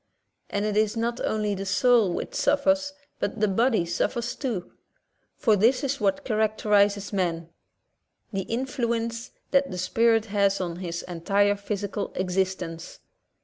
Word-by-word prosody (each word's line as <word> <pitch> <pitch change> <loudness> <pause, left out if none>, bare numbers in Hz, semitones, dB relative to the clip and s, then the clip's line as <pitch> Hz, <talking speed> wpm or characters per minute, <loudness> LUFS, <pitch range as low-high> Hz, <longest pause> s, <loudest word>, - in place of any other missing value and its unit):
And 205 +1 -1
it 210 -1 -1
is 215 +1 +2
not 235 +1 -1
only 210 -1 0
the 195 0 -4
soul 230 -1 +4
which - - -4
suffers, 285 0 +2 0.3
but 205 - -2
the 215 - +3
body 220 -1 +2
suffers 235 +8 -1
too. 230 -10 -4 0.7
For 220 -3 +3
this 235 +7 +3
is 275 0 -2
what 195 -2 +1
char 215 -3 -1
acterizes 205 -2 +2
man 170 -4 -1 0.4
— - - -44
the 195 - 0
influence 235 0 -2 0.2
that 275 0 +3
the 180 - -5
spirit 225 +4 +2
has 200 -2 +1
on 175 -2 -3
his 170 -2 -4
entire 200 +4 +1
physical 200 0 -4
existence. 180 -2 -2
210 Hz, 145 wpm, -26 LUFS, 190-235 Hz, 0.7 s, soul